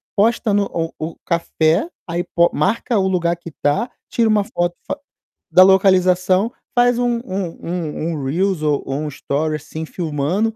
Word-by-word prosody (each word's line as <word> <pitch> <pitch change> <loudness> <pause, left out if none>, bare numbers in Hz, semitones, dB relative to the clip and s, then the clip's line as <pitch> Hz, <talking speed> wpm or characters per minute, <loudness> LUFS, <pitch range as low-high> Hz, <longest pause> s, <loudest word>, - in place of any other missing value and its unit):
posta 220 0 +2
no 200 0 +3
o 165 -1 -2
o 160 +1 -5
café, 170 - +1 0.2
aí 175 +1 -1
po 170 -1 +2
marca 230 - 0
o 190 - +2
lugar 175 -2 +1
que 170 -1 -11
tá, 145 - +1 0.2
tira 230 -2 +2
uma 210 -1 +3
foto 175 0 -1
fa 290 - -3 0.5
da 185 +3 +8
localização, 185 +1 +4 0.2
faz 245 0 +4
um 240 -1 +1
um 170 -3 -4
um 145 -3 -4
reels 180 +4 0
ou 150 -2 +1
ou 135 - -3
um 155 - -3
story, 150 +2 -2
assim, 155 +1 -6
filmando 170 +7 -1
175 Hz, 165 wpm, -19 LUFS, 160-200 Hz, 0.5 s, da